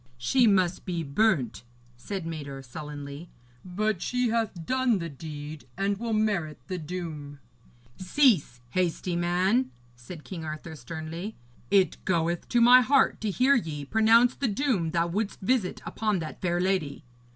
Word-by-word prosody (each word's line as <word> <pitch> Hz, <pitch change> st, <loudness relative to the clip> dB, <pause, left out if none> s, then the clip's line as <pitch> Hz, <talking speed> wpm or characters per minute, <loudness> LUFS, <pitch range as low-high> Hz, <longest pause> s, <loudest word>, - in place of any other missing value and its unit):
'She 235 Hz, -, +3 dB
must 185 Hz, -3 st, +2 dB
be 170 Hz, -3 st, -3 dB
burnt,' 140 Hz, -, +1 dB, 0.3 s
said 185 Hz, +9 st, -5 dB
Mador 140 Hz, -4 st, -6 dB
sullenly. 145 Hz, +3 st, -8 dB, 0.3 s
'But 195 Hz, +1 st, -1 dB
she 250 Hz, -1 st, 0 dB
hath 220 Hz, -7 st, -1 dB
done 260 Hz, -1 st, +2 dB
the 170 Hz, -2 st, -4 dB
deed 145 Hz, -1 st, -8 dB
and 200 Hz, 0 st, 0 dB
will 235 Hz, 0 st, -3 dB
merit 200 Hz, -, 0 dB
the 185 Hz, +3 st, -4 dB
doom.' 155 Hz, -4 st, -6 dB, 0.6 s
'Cease, 185 Hz, -, +2 dB
hasty 180 Hz, 0 st, -1 dB
man,' 185 Hz, +9 st, +1 dB, 0.3 s
said 150 Hz, +7 st, -10 dB
King 175 Hz, -4 st, -7 dB
Arthur 155 Hz, +1 st, -6 dB
sternly; 160 Hz, -, -6 dB, 0.3 s
'it 190 Hz, -5 st, +2 dB
goeth 170 Hz, -1 st, 0 dB
to 240 Hz, -, +3 dB
my 245 Hz, +2 st, +8 dB
heart 265 Hz, +2 st, +3 dB
to 215 Hz, -, -1 dB
hear 255 Hz, +7 st, +3 dB
ye 155 Hz, -, -1 dB
pronounce 225 Hz, -, +5 dB
the 275 Hz, -, -1 dB
doom 210 Hz, -, 0 dB
thou 170 Hz, +1 st, +1 dB
wouldst 200 Hz, +5 st, -2 dB
visit 220 Hz, -2 st, 0 dB
upon 215 Hz, -3 st, -1 dB
that 160 Hz, -3 st, -6 dB
fair 175 Hz, -1 st, 0 dB
lady. 180 Hz, -6 st, -1 dB
180 Hz, 150 wpm, -27 LUFS, 155-220 Hz, 0.6 s, my